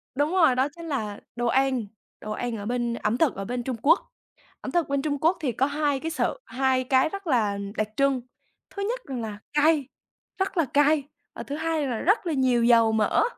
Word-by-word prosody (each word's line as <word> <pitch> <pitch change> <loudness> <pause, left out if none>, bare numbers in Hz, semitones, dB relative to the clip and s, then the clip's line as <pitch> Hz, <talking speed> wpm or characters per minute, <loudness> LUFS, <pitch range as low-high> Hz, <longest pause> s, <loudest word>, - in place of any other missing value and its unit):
Đúng 290 +4 +1
rồi, 325 -9 +4
đó 260 +2 +2
chính 335 -1 -9
là 215 -8 -3 0.2
đồ 240 0 -1
ăn, 260 -2 +2 0.4
đồ 215 - -6
ăn 235 +1 -3
ở 205 - -6
bên 240 0 -1
ẩm 235 0 -1
thực 315 -7 +2
ở 195 0 -5
bên 245 +1 -3
Trung 255 -1 -3
Quốc. 325 +5 +5 0.6
Ẩm - - -5
thực 345 -4 0
bên 280 -1 0
Trung 290 -1 -1
Quốc 340 +3 +3
thì 270 -6 0
có 260 +4 +1
hai 290 -1 0
cái 325 +3 -4
sự, - - -1
hai 260 0 +1
cái 260 +3 +3
rất 395 -1 -7
là 215 -7 +1 0.2
đặc 215 - 0
trưng 275 -2 +2 0.5
thứ 400 - -4
nhất - - -2
rằng 255 -4 -4
là 215 -2 -5 0.2
cay, 300 -2 +3 0.5
rất 380 -1 -1
là 325 - +3
cay 290 +2 +3 0.3
và - - -6
thứ 285 - -5
hai 315 -2 -1
là 240 - -2
rất 400 +3 +2
là 325 - 0
nhiều 255 -4 +2
dầu 230 -2 +5
mỡ. 220 -2 +2
270 Hz, 225 wpm, -25 LUFS, 240-310 Hz, 0.6 s, Quốc